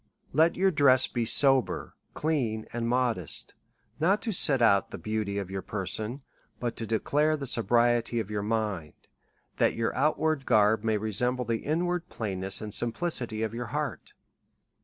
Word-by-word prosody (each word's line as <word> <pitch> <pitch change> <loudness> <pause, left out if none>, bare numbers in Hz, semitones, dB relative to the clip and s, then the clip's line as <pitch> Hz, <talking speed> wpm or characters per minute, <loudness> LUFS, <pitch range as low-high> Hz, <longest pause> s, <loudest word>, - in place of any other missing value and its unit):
Let 160 +4 +3
your 190 +1 +2
dress 135 -5 +4
be 120 -2 -3
sober, 135 +2 +3 0.2
clean, 125 -9 -1
and 115 0 -2
modest, 120 - -1 0.5
not 190 +7 +2
to 225 - -2
set 145 -8 +5
out 100 -5 +3
the - - -7
beauty 110 -2 -3
of 100 -2 -5
your 95 0 -4
person, 105 +7 -3 0.4
but 120 -2 -3
to 115 - -4
declare 150 +8 +1
the 140 - -6
sobriety 120 0 +2
of 105 -2 -5
your 105 -1 -2
mind, 105 -7 -3 0.6
that - - +2
your 115 -1 -2
outward 155 +1 0
garb 105 +1 +3
may 110 -1 +1
resemble 125 +4 -1
the 115 0 -1
inward 175 +5 -2
plainness 95 -3 -2
and 105 -2 -6
simplicity 120 -3 +1
of 110 0 -3
your 120 0 -5
heart. - - -5
115 Hz, 160 wpm, -27 LUFS, 110-140 Hz, 0.6 s, set